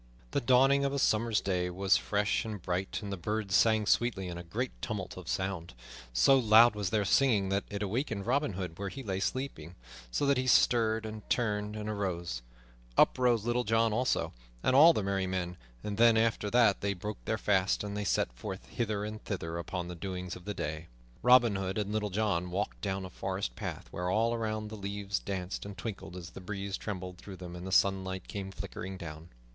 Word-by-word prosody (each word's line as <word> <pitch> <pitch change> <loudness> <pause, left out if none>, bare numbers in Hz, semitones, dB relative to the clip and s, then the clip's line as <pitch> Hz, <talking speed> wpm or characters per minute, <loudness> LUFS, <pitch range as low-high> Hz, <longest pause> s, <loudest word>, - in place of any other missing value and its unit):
The - - +1
dawning 135 +3 +5
of 140 0 0
a - - 0
summer's 115 -4 +2
day 90 -2 0
was 95 +2 +3
fresh 105 +1 +1
and 110 -2 -5
bright, 90 +4 -2
and 100 - -5
the - - -4
birds 105 +2 -2
sang 110 +1 +4
sweetly 100 -4 +1
in 85 - -5
a - - -7
great 115 +9 -3
tumult 105 -5 -4
of 90 -2 -10
sound. 90 -7 -3 0.4
So - - +5
loud 115 0 +7
was 105 -3 -2
their 105 +1 +1
singing 105 -4 +3
that 100 +1 0
it 100 0 -3
awakened 105 -1 -2
Robin 135 -1 +1
Hood 90 -2 -5
where 100 -1 -2
he 135 +8 -7
lay 95 -4 -2
sleeping, 95 - -3 0.3
so 100 - 0
that 140 -1 +3
he 130 - -1
stirred, 110 -3 +4
and 110 -1 -8
turned, 105 -3 0
and 105 0 -5
arose. 90 - -2 0.6
Up - - +5
rose 120 -4 +3
Little 120 +1 +1
John 115 0 +2
also, 125 +3 0 0.3
and 130 - +3
all 155 +5 +9
the 110 - -1
merry 95 -1 0
men; 90 -1 -2 0.3
then, 110 +2 +4
after 110 -2 +1
they 115 -2 +5
had 100 -2 -1
broken 105 +2 -5
their 110 - 0
fast, 100 -3 +2
they 105 0 -3
set 75 -10 +1
forth - - -7
hither 105 - -2
and 110 0 -6
thither 85 -4 -3
upon 85 +1 -4
the 90 - -5
doings 90 0 -5
of 90 - -12
the 105 - -4
day. 75 +2 -4 0.3
Robin 120 -4 +6
Hood 95 0 -2
and 105 -1 -1
Little 105 -1 -1
John 95 -3 0
walked 100 +4 -3
down 95 -1 -2
a 90 - -9
forest 95 +1 -3
path - - -5
where 90 0 -2
all 115 +4 +2
around 110 -2 -2
the 110 - -7
leaves 100 -1 -3
danced 95 -1 -4
and 100 -2 -8
twinkled 95 -1 -6
as 85 -2 -8
the - - -10
breeze 100 +1 -4
trembled 90 -4 -6
through 100 - -9
them 90 -1 -8
and 90 +1 -7
the - - -5
sunlight 95 -1 +2
came 100 -2 -5
flickering 95 0 -6
down. 80 -2 -8
100 Hz, 205 wpm, -31 LUFS, 95-110 Hz, 0.6 s, all